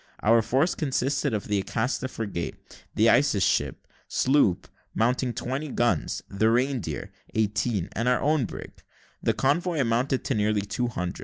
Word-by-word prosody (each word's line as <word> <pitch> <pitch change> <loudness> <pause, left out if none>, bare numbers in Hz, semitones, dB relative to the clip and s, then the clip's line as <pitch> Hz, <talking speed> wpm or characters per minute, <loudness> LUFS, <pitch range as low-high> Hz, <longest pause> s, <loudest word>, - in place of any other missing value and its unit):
Our 115 +2 +5
force 135 +10 +1
consisted 140 -1 0
of 105 -3 -3
the 105 -1 +1
Acasta 120 +6 -1
frigate, 105 -8 -4 0.4
the - - +4
Isis - - +4
ship, - - 0 0.2
sloop, 130 -9 +2 0.3
mounting 125 +2 +1
twenty 135 +6 -4
guns, 120 - 0
the 110 +3 +1
Reindeer, 125 -2 -1 0.2
eighteen, 105 -2 0
and 115 +2 -2
our 125 0 +3
own 150 -3 +2
brig. - - -8 0.5
The - - +1
convoy 160 +4 +1
amounted 125 +2 +1
to - - -1
nearly 105 -1 +1
two 105 +5 -2
hundred. 90 -6 -4
120 Hz, 150 wpm, -26 LUFS, 105-135 Hz, 0.5 s, Our